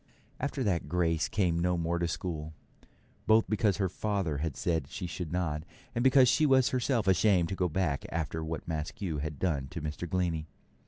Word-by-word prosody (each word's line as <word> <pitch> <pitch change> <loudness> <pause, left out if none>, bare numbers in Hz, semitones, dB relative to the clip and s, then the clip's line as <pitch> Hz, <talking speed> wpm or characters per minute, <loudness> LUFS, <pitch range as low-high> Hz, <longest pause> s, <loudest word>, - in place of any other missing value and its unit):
After 140 0 -2
that 85 -9 0
Grace 85 -1 +1
came 90 -5 +1
no 90 +1 +1
more 85 +1 -1
to 85 - +1
school, 80 -3 -4 0.7
both 110 +1 +5
because 105 -2 +2
her 95 -2 +1
father 95 -4 -1
had 80 -2 -3
said 80 -6 0
she 95 - -5
should 85 -1 -5
not, 85 -4 -1 0.3
and 120 - 0
because 130 -1 +6
she 150 +5 +4
was 130 -1 +5
herself 125 -4 0
ashamed 95 -2 +4
to 95 - -2
go 90 -1 0
back 75 -5 -1
after 80 0 -3
what 80 -1 -5
Maskew 80 +1 -3
had 75 0 -4
done 75 -7 -1
to 85 - -6
Mr. 80 +3 -5
Glennie. 85 -4 -1
85 Hz, 190 wpm, -30 LUFS, 80-100 Hz, 0.7 s, because